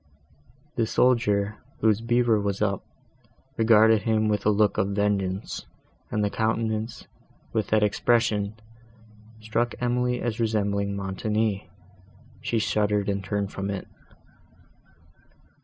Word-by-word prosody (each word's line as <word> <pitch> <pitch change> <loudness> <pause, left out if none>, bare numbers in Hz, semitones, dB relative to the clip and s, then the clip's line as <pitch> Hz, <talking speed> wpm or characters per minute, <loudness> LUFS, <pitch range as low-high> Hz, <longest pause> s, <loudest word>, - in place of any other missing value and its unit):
The 115 -2 +2
soldier, 110 -5 +2 0.2
whose 110 -1 +3
beaver 120 -2 +2
was 100 -1 -2
up, 100 -2 0 0.7
regarded 110 -1 +5
him 110 -1 +1
with 105 0 0
a - - +6
look 105 0 +2
of 100 +1 0
vengeance, 100 -2 -1 0.4
and 105 - 0
the 105 - 0
countenance, 110 +1 -1 0.5
with 110 -3 0
that 110 -1 +3
expression, 105 -1 +1 0.9
struck 115 +2 -1
Emily 125 0 0
as 120 -1 -3
resembling 100 -3 0
Montoni. 100 +1 -1 0.7
She 115 - -1
shuddered, 105 -2 +1
and 100 -1 -1
turned 100 +1 -2
from 100 0 -4
it. 100 -2 -4
105 Hz, 115 wpm, -26 LUFS, 100-115 Hz, 0.9 s, a